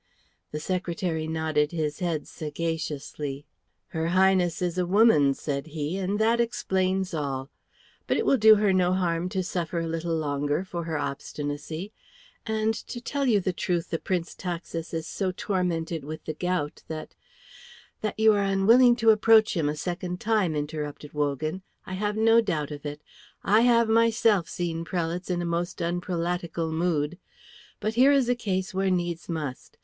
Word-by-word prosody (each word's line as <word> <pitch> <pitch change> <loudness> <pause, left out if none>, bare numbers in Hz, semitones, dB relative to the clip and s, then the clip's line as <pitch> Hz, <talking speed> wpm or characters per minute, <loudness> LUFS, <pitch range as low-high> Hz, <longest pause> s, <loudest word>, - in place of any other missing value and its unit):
The 150 - -3
secretary 170 -2 -2
nodded 160 -2 0
his 150 -3 -2
head 170 -4 -2
sagaciously. 150 -3 -4 0.4
"Her 160 0 -2
Highness 185 -1 +3
is 180 0 -1
a 180 - 0
woman," 180 -9 +5
said 140 +1 -3
he, 155 +3 -3
"and 195 +2 -1
that 225 +2 +3
explains 190 -5 0
all. 140 -3 -3 0.6
But - - +2
it - - 0
will 275 - +4
do 220 0 +8
her 205 -2 +2
no 180 -1 +3
harm 175 -1 0
to 190 0 -1
suffer 175 -2 -3
a 165 - 0
little 165 0 -2
longer 145 +1 -1
for 170 -3 -5
her 160 -2 -2
obstinacy, 145 +6 -4 0.5
and, 220 0 +1
to 240 +2 -7
tell 275 +3 -2
you 215 -4 +4
the 185 -1 -1
truth, 175 -1 -2
the 165 - -1
Prince 175 -3 -2
Taxis 170 -2 -5
is 160 -1 -3
so 190 +3 -2
tormented 175 -4 -2
with 155 +2 -7
the 155 - -3
gout 175 -2 -2
that 155 -1 -6 0.4
" - - -21
"That 215 0 -3
you 220 0 +6
are 205 - +2
unwilling 225 +6 +5
to 230 -2 +5
approach 220 +1 +5
him 155 -4 +1
a 150 - -2
second 180 +2 -4
time," 210 -7 +1
interrupted 150 0 -5
Wogan. 150 +4 -1 0.2
"I 185 - -7
have 210 +2 -1
no 225 +1 +5
doubt 150 -9 -2
of 145 0 -6
it. 145 +1 -7 0.4
I 215 +3 +4
have 235 -1 +4
myself 225 -4 +3
seen 165 -2 -3
prelates 175 +1 -3
in 175 -1 0
a - - -2
most 170 +1 -2
unprelatical 170 -1 -2
mood. 160 0 0 0.6
But 215 - -1
here 255 +4 +6
is 270 -4 +3
a - - +5
case 190 -3 -2
where 190 0 +1
needs 175 -2 -2
must. 150 -6 -5
175 Hz, 170 wpm, -26 LUFS, 155-195 Hz, 0.6 s, do